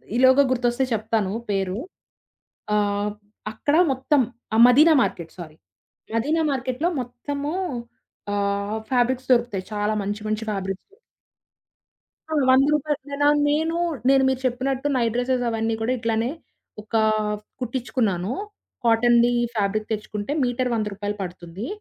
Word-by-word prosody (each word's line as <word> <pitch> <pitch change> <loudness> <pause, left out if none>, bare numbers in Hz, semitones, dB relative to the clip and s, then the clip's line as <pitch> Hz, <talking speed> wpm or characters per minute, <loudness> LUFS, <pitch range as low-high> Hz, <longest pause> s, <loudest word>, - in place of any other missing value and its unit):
ఈలోగా 260 +3 +6
గుర్తొస్తే 245 +1 +1
చెప్తాను 215 -2 0 0.2
పేరు 195 -1 -1 1.0
ఆహ్, 205 0 0 0.4
అక్కడ 285 +7 0 0.2
మొత్తం 265 +2 +2 0.3
ఆ! - - +3
మదీనా 305 +6 +6
మార్కెట్ 165 -2 -4
సారీ 155 -3 -9 0.6
మదీనా 300 +8 +1
మార్కెట్లో 260 +4 -1
మొత్తము 280 +4 -5 0.8
ఆహ్, 200 +1 -1
ఫ్యాబ్రిక్స్ 255 +1 +1
దొరుకుతాయి. 235 -6 0
చాలా 210 +1 0
మంచి 205 +2 -3
మంచి 215 +1 -1
ఫ్యాబ్రిక్స్. 195 -1 -4 1.4
అవును. 290 -4 +2
100 260 +1 +6
రూపాయలు 300 0 0
నేన 285 +1 0 0.2
నేను 320 +3 +1 0.3
నేను 270 0 +5
మీరు 265 - -1
చెప్పినట్టు 260 +3 -1
నైట్ 235 -3 +1
డ్రెసెస్ 245 0 0
అవన్నీ 225 0 -1
కూడా 235 +3 0
ఇట్లానే 230 +1 0 0.5
ఒక 215 +2 -7 0.6
కుట్టించుకున్నాను 235 -6 -1 0.5
కాటన్‌ది 235 +1 +4 0.2
ఫ్యాబ్రిక్ 215 +1 0
తెచ్చుకుంటే 210 +2 -4
మీటర్ 250 +1 0
100 215 -2 0
రూపాయలు 205 +1 -4
పడుతుంది. 180 +4 -6
235 Hz, 120 wpm, -23 LUFS, 205-260 Hz, 1.4 s, ఈలోగా